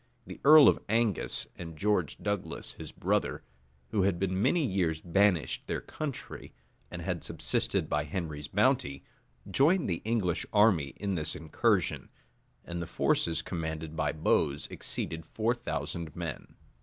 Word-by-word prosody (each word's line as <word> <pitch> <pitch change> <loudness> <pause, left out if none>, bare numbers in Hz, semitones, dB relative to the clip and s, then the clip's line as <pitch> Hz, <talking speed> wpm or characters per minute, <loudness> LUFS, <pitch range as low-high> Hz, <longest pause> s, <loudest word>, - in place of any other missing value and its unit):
The - - -10
earl 150 0 +9
of - - +5
Angus, 110 -4 +2
and 85 -2 -8
George 100 -6 0
Douglas, 105 -2 -3
his - - -9
brother, - - -1 0.5
who 105 - +2
had 95 -2 +2
been 95 +1 -1
many 165 +6 +3
years 90 -7 0
banished 90 -4 +1
their - - -1
country, 150 -4 -6 0.4
and - - -6
had - - -2
subsisted - - -1
by 75 0 0
Henry's 75 -3 -4
bounty, 70 -1 +1 0.5
joined 165 +6 +3
the 85 -3 -2
English 100 -7 0
army 100 -10 +3
in 100 -1 -2
this 80 -3 -2
incursion, 90 - 0 0.6
and 85 0 -4
the 85 - -4
forces 80 +1 +1
commanded 80 -2 -4
by - - 0
Bowes 75 -2 +1
exceeded 80 0 -4
four 115 +8 0
thousand 85 - -4
men. - - -6
90 Hz, 145 wpm, -30 LUFS, 80-105 Hz, 0.6 s, earl